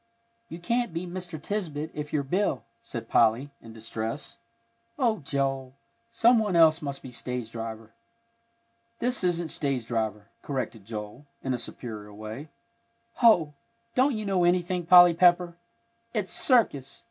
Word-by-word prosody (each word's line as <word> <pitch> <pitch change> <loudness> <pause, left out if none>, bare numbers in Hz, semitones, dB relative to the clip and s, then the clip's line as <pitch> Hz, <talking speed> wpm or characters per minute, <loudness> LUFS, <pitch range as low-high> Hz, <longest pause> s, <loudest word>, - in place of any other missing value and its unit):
"You 165 - -7
can't 235 +2 -1
be 170 +2 -2
Mr. 175 -2 -6
Tisbett 160 -4 -3
if 150 0 -6
you're 145 -2 0
Bill," 175 -1 0 0.2
said 115 -2 -7
Polly, 115 +6 +3
in 115 - -12
distress. 115 +4 -5 0.6
"Oh, 235 -6 +1
Joel, 135 -2 -2 0.3
some 230 +1 +4
one 210 -4 0
else 160 -1 +6
must 140 -2 -5
be 130 - -8
stage 125 -1 -5
driver." 115 -1 -7 1.0
"This 245 -3 0
isn't 175 -2 0
stage 135 -6 -2
driver," 110 -2 -3
corrected 130 -7 -4
Joel, 110 +5 -7 0.2
in 130 - -1
a 125 - -2
superior 110 -3 -8
way. 110 +8 -7 0.7
"Hoh! 175 -11 +5 0.4
don't 260 +1 +3
you 215 -1 -4
know 190 -3 +1
anything, 175 0 +1
Polly 175 -1 +9
Pepper! 175 0 +4 0.6
It's 200 -4 -1
circus! 145 - +2
150 Hz, 140 wpm, -27 LUFS, 120-180 Hz, 1.0 s, Polly